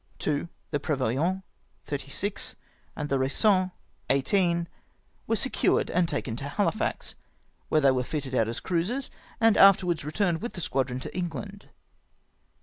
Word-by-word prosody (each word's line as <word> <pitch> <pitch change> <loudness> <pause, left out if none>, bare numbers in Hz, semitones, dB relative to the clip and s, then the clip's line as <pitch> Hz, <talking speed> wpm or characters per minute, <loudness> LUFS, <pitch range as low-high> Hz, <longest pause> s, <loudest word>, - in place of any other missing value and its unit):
Two, 150 +2 -1 0.2
the 145 - 0
Prevoyant, 145 +7 0 0.4
36, 145 +8 -3 0.4
and 150 - -3
the 135 -2 +1
Raison, 185 +8 +3 0.4
18, 170 +4 +2 0.6
were 225 - +2
seciu 260 +5 +2
ed - - -3
and 175 -1 +2
taken 115 -8 -2
to 135 - -5
Hahfax, 205 +8 -1 0.6
where 155 - +3
they 140 -2 +6
were 130 -1 +1
fitted 140 -1 -4
out 115 -3 +3
as 115 - -2
cruisers, 190 +10 -1 0.3
and 225 -2 +5
afterwards 180 -4 +6
retm^ned 165 +3 0
with 240 - -5
the - - -6
squadi'on 130 -4 -1
to - - -8
England. 190 +3 -5
165 Hz, 145 wpm, -27 LUFS, 140-195 Hz, 0.6 s, they